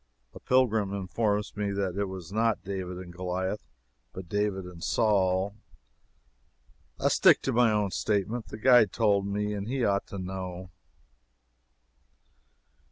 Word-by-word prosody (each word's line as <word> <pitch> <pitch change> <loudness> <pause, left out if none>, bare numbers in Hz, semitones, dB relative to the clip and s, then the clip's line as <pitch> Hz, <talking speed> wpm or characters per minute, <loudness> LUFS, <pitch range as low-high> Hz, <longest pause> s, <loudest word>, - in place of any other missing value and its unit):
[A - - -10
pilgrim 110 -6 +2
informs 105 +2 -1
me 105 0 -1
that 95 -2 -2
it 100 0 0
was 95 -2 -8
not 110 -1 +1
David 95 -2 -5
and 90 -1 -9
Goliah, 95 +3 -3 0.5
but 95 -2 -8
David 100 0 -1
and 90 -2 -10
Saul. 100 -3 +2 1.5
I - - +2
stick - - +5
to 135 - -1
my 120 -1 +4
own 105 -2 0
statement 110 +4 -1
the - - -8
guide 120 -3 +5
told 100 -3 +2
me, 105 +1 -2
and 100 0 -4
he 130 -1 0
ought 100 0 0
to 100 - -7
know. 95 -1 -6
100 Hz, 140 wpm, -28 LUFS, 95-105 Hz, 1.5 s, stick